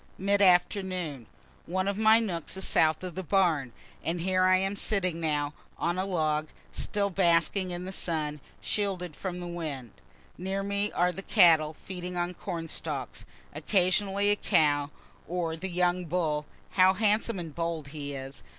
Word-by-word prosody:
Mid 200 Hz, +1 st, +1 dB
afternoon. 180 Hz, -, +2 dB, 0.4 s
One 185 Hz, +2 st, -1 dB
of 200 Hz, -, 0 dB
my 220 Hz, +2 st, +6 dB
nooks 185 Hz, -6 st, -3 dB
is 190 Hz, -, -2 dB
south 155 Hz, +2 st, +3 dB
of 180 Hz, -2 st, -5 dB
the 190 Hz, -, -4 dB
barn, 165 Hz, -8 st, +1 dB, 0.3 s
and 170 Hz, +1 st, -2 dB
here 185 Hz, +1 st, +2 dB
I 185 Hz, 0 st, +5 dB
am 195 Hz, +2 st, -1 dB
sitting 185 Hz, -5 st, -1 dB
now, 150 Hz, -2 st, 0 dB, 0.2 s
on 175 Hz, +2 st, -1 dB
a 190 Hz, -, 0 dB
log, 155 Hz, -5 st, 0 dB, 0.2 s
still 200 Hz, -1 st, -1 dB
basking 180 Hz, +1 st, +3 dB
in 175 Hz, 0 st, -4 dB
the 190 Hz, -, -5 dB
sun, 155 Hz, -5 st, -2 dB, 0.2 s
shielded 185 Hz, -6 st, -2 dB
from 180 Hz, -2 st, -5 dB
the 175 Hz, -, -6 dB
wind. 155 Hz, -9 st, -5 dB, 0.5 s
Near 190 Hz, +2 st, -2 dB
me 200 Hz, +1 st, 0 dB
are 180 Hz, +1 st, +2 dB
the 195 Hz, -, -7 dB
cattle, 165 Hz, -7 st, +5 dB
feeding 180 Hz, 0 st, -6 dB
on 175 Hz, +1 st, -1 dB
corn 170 Hz, -3 st, -5 dB
stalks. -, -, -4 dB, 0.3 s
Occasionally 200 Hz, +1 st, +2 dB
a -, -, +4 dB
cow 145 Hz, -8 st, +2 dB, 0.4 s
or 170 Hz, -1 st, -2 dB
the 190 Hz, +4 st, -5 dB
young 180 Hz, 0 st, +1 dB
bull 155 Hz, -3 st, -1 dB, 0.2 s
(how 185 Hz, 0 st, +5 dB
handsome 215 Hz, +1 st, +1 dB
and 165 Hz, -4 st, -6 dB
bold 165 Hz, -3 st, -3 dB
he 145 Hz, -1 st, -5 dB
is!) 135 Hz, 0 st, -8 dB
180 Hz, 165 wpm, -28 LUFS, 160-190 Hz, 0.5 s, my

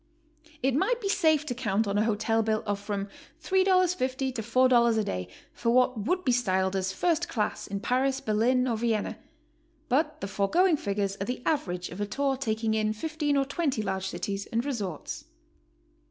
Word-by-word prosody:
It 265 Hz, 0 st, +2 dB
might 410 Hz, -, +1 dB
be 415 Hz, -, -3 dB
safe 315 Hz, -5 st, +3 dB
to 265 Hz, -, -2 dB
count 220 Hz, -3 st, 0 dB
on 200 Hz, -, -1 dB
a -, -, +3 dB
hotel 225 Hz, +1 st, +1 dB
bill 220 Hz, 0 st, 0 dB
of 205 Hz, -1 st, -1 dB
from 200 Hz, -1 st, -3 dB, 0.4 s
$3.50 365 Hz, -9 st, +2 dB
to 235 Hz, -, -3 dB
$4 235 Hz, 0 st, +4 dB
a 220 Hz, -, +2 dB
day 90 Hz, -, -3 dB, 0.3 s
for 235 Hz, -, -1 dB
what 250 Hz, -3 st, +2 dB
would 365 Hz, 0 st, 0 dB
be 255 Hz, -, +3 dB
styled 190 Hz, -6 st, +1 dB
as 190 Hz, 0 st, 0 dB
first 340 Hz, -, 0 dB
class 210 Hz, -4 st, -2 dB
in 200 Hz, 0 st, -4 dB
Paris, 265 Hz, +4 st, +1 dB
Berlin, 250 Hz, +1 st, +2 dB
or 230 Hz, -3 st, 0 dB
Vienna, 225 Hz, -2 st, -1 dB, 0.7 s
but 275 Hz, +6 st, +1 dB
the 195 Hz, -, -4 dB
foregoing 310 Hz, -, +2 dB
figures 200 Hz, -3 st, -2 dB
are -, -, 0 dB
the 250 Hz, +1 st, -4 dB
average 180 Hz, -, -1 dB
of 180 Hz, +4 st, -7 dB
a 205 Hz, -, -1 dB
tour 275 Hz, +4 st, 0 dB
taking 220 Hz, -4 st, -1 dB
in 215 Hz, 0 st, +1 dB
15 295 Hz, +4 st, -1 dB
or 275 Hz, -, +2 dB
20 275 Hz, -5 st, -1 dB
large 190 Hz, -1 st, -2 dB
cities 195 Hz, +1 st, -4 dB
and 230 Hz, +2 st, -1 dB
resorts. 205 Hz, -, -4 dB
235 Hz, 185 wpm, -28 LUFS, 205-275 Hz, 0.7 s, $4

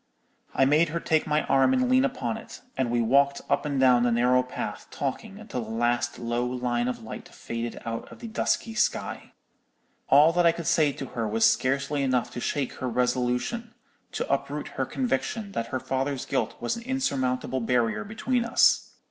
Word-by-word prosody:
"I 135 Hz, -, +4 dB
made 155 Hz, +4 st, +4 dB
her 170 Hz, +2 st, -2 dB
take 160 Hz, -1 st, +1 dB
my 150 Hz, 0 st, +2 dB
arm 135 Hz, -, +3 dB
and 255 Hz, -1 st, +2 dB
lean 255 Hz, +1 st, +4 dB
upon 255 Hz, -4 st, -1 dB
it, 225 Hz, -, -10 dB
and 130 Hz, -2 st, 0 dB
we 120 Hz, 0 st, +1 dB
walked 140 Hz, +4 st, +3 dB
up -, -, +1 dB
and 140 Hz, -2 st, -1 dB
down 125 Hz, -2 st, +5 dB
the 120 Hz, 0 st, +2 dB
narrow 125 Hz, +2 st, +3 dB
path 125 Hz, -4 st, -6 dB
talking 195 Hz, +9 st, -4 dB
until 215 Hz, -, -5 dB
the 110 Hz, -, -9 dB
last 120 Hz, +2 st, 0 dB
low 120 Hz, 0 st, -1 dB
line 125 Hz, -1 st, -1 dB
of 125 Hz, -2 st, -4 dB
light 110 Hz, -, -8 dB
faded 115 Hz, 0 st, -5 dB
out 115 Hz, 0 st, -5 dB
of -, -, -11 dB
the 235 Hz, -, -8 dB
dusky 225 Hz, 0 st, -1 dB
sky. 215 Hz, -1 st, -1 dB, 0.8 s
"All 150 Hz, +4 st, +6 dB
that 175 Hz, 0 st, +3 dB
I 165 Hz, -, +5 dB
could 170 Hz, -1 st, -6 dB
say 150 Hz, -2 st, +3 dB
to 135 Hz, -, -6 dB
her 115 Hz, -2 st, -3 dB
was 110 Hz, +1 st, +2 dB
scarcely 140 Hz, +2 st, +1 dB
enough 130 Hz, -3 st, 0 dB
to -, -, -6 dB
shake 135 Hz, +1 st, -2 dB
her 130 Hz, -, -2 dB
resolution—to 125 Hz, -, -2 dB
uproot -, -, -2 dB
her -, -, -2 dB
conviction 235 Hz, -4 st, -2 dB
that 115 Hz, -10 st, -3 dB
her 130 Hz, +2 st, -3 dB
father's 135 Hz, +1 st, -2 dB
guilt -, -, -1 dB
was 120 Hz, -, -1 dB
an 235 Hz, -, -7 dB
insurmountable 130 Hz, -, -1 dB
barrier 115 Hz, -1 st, +1 dB
between 235 Hz, +4 st, -1 dB
us. 230 Hz, -, +3 dB
135 Hz, 190 wpm, -26 LUFS, 120-175 Hz, 0.8 s, All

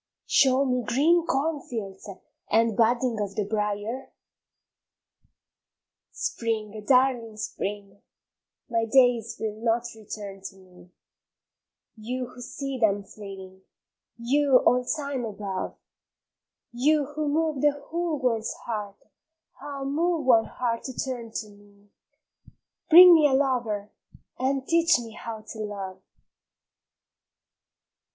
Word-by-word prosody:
Show 270 Hz, 0 st, +4 dB
me 250 Hz, -1 st, 0 dB
green 325 Hz, +9 st, +2 dB
cornfields 245 Hz, -11 st, -3 dB, 0.4 s
and 225 Hz, -1 st, +3 dB
budding 235 Hz, +1 st, +2 dB
of 200 Hz, -1 st, -3 dB
the 210 Hz, -, 0 dB
briar? 210 Hz, +4 st, -3 dB, 2.0 s
Spring, 215 Hz, -2 st, -3 dB
darling 250 Hz, -4 st, +2 dB
Spring, 200 Hz, -1 st, -5 dB, 0.7 s
my 230 Hz, -1 st, 0 dB
days 240 Hz, -1 st, +3 dB
will 215 Hz, 0 st, -4 dB
not 230 Hz, +1 st, +1 dB
return 205 Hz, -2 st, -8 dB
to 195 Hz, -, -7 dB
me, 180 Hz, -2 st, -18 dB, 1.1 s
You 250 Hz, +3 st, -4 dB
who 250 Hz, -, -11 dB
see 275 Hz, +1 st, -5 dB
them 205 Hz, -3 st, +2 dB
fleeting, 195 Hz, -2 st, -11 dB, 0.6 s
you, 270 Hz, +3 st, +3 dB
all 250 Hz, 0 st, +4 dB
time 280 Hz, -1 st, -3 dB
above, 200 Hz, -4 st, -5 dB, 0.9 s
You 290 Hz, +5 st, +2 dB
who 300 Hz, 0 st, -1 dB
move 310 Hz, -2 st, 0 dB
the 295 Hz, -1 st, +4 dB
whole 335 Hz, +1 st, -3 dB
world's 230 Hz, -5 st, -1 dB
heart, 210 Hz, -3 st, -6 dB, 0.6 s
ah 280 Hz, -1 st, -6 dB
move 315 Hz, +3 st, 0 dB
one 230 Hz, -3 st, +5 dB
heart 235 Hz, -2 st, -2 dB
to 260 Hz, -, -5 dB
turn 245 Hz, -3 st, -4 dB
to 220 Hz, -1 st, -5 dB
me, 205 Hz, 0 st, -21 dB, 1.0 s
Bring 355 Hz, +2 st, +11 dB
me 310 Hz, -3 st, +6 dB
a 275 Hz, -, 0 dB
lover, 245 Hz, -7 st, 0 dB, 0.5 s
and 265 Hz, +1 st, -1 dB
teach 335 Hz, -2 st, +4 dB
me 235 Hz, -2 st, -7 dB
how 225 Hz, 0 st, -7 dB
to 220 Hz, +1 st, -10 dB
love! 200 Hz, -3 st, -6 dB
235 Hz, 115 wpm, -26 LUFS, 210-270 Hz, 2.0 s, Bring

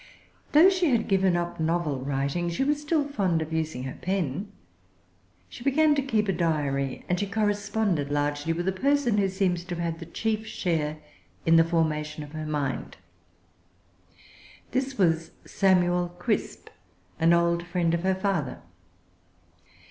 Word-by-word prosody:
Though 330 Hz, +6 st, +8 dB
she 365 Hz, -4 st, +1 dB
had 235 Hz, -4 st, +1 dB
given 190 Hz, -2 st, +3 dB
up 175 Hz, 0 st, -3 dB
novel 160 Hz, -3 st, 0 dB
writing 140 Hz, +5 st, -1 dB
she 170 Hz, +10 st, -1 dB
was 295 Hz, +1 st, 0 dB
still 300 Hz, -1 st, 0 dB
fond 190 Hz, -, 0 dB
of 160 Hz, 0 st, -4 dB
using 160 Hz, -5 st, -2 dB
her 130 Hz, -, -6 dB
pen. 185 Hz, 0 st, -2 dB, 1.0 s
She -, -, -11 dB
began 300 Hz, +3 st, +4 dB
to 285 Hz, -, +1 dB
keep 220 Hz, -6 st, 0 dB
a 195 Hz, -, +1 dB
diary, 145 Hz, -6 st, -1 dB
and 180 Hz, 0 st, 0 dB
she 205 Hz, -, -1 dB
corresponded 205 Hz, -6 st, 0 dB
largely 145 Hz, +2 st, -1 dB
with 175 Hz, +2 st, -2 dB
a -, -, +3 dB
person 260 Hz, +1 st, +1 dB
who 195 Hz, -1 st, +2 dB
seems 185 Hz, -2 st, 0 dB
to 180 Hz, -2 st, -4 dB
have 170 Hz, -, -3 dB
had 165 Hz, -1 st, -3 dB
the 165 Hz, -, -8 dB
chief 220 Hz, +4 st, -2 dB
share 155 Hz, -4 st, -1 dB, 0.5 s
in 165 Hz, -, +5 dB
the 165 Hz, -, +7 dB
formation 155 Hz, -2 st, -1 dB
of 145 Hz, -, -11 dB
her 155 Hz, 0 st, -5 dB
mind. 145 Hz, -3 st, -3 dB, 1.7 s
This 260 Hz, 0 st, -1 dB
was 165 Hz, -4 st, +2 dB, 0.2 s
Samuel 180 Hz, -2 st, +2 dB
Crisp, 175 Hz, -, -2 dB, 0.5 s
an 165 Hz, +1 st, +4 dB
old 170 Hz, 0 st, +3 dB
friend 175 Hz, -2 st, 0 dB
of 170 Hz, -, 0 dB
her 190 Hz, +1 st, +1 dB
father. 190 Hz, -8 st, -1 dB
175 Hz, 155 wpm, -26 LUFS, 160-205 Hz, 1.7 s, Though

